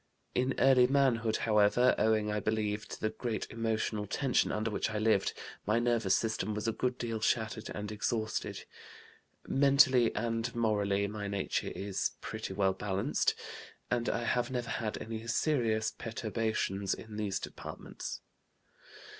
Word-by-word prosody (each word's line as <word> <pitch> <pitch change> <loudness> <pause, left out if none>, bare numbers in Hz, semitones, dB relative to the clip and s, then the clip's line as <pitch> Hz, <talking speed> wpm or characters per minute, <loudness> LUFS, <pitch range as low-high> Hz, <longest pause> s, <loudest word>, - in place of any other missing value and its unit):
In 130 +1 +1
early 130 -2 +6
manhood, 125 -5 +2
however, 110 +3 +4
owing, 110 -1 +2
I 105 - 0
believe, 105 0 -1
to - - -7
the 110 - 0
great 110 0 -3
emotional 110 -2 -1
tension 135 +4 +1
under 110 +1 -1
which - - -1
I 110 - -3
lived, 105 -2 +2 0.3
my 105 +2 +3
nervous 115 -5 +2
system 110 -2 -1
was 105 +1 -2
a - - +3
good 125 +2 -1
deal 115 -3 -3
shattered 110 0 0
and 105 0 -4
exhausted. 110 +1 -2 0.8
Mentally 135 -3 +5
and 115 0 -1
morally 100 -3 +1
my 105 0 -4
nature 100 -1 -2
is 100 0 -2
pretty 110 -2 -5
well 95 -1 +2
balanced, 100 +7 0 0.6
and 120 -1 +1
I 120 - -1
have 120 +1 +1
never 120 -2 -3
had 110 -2 -2
any 110 0 -6
serious 115 -4 +1
perturbations 110 -3 -2
in 110 -1 -9
these 100 -2 -1
departments. - - -7
110 Hz, 145 wpm, -32 LUFS, 105-120 Hz, 0.8 s, early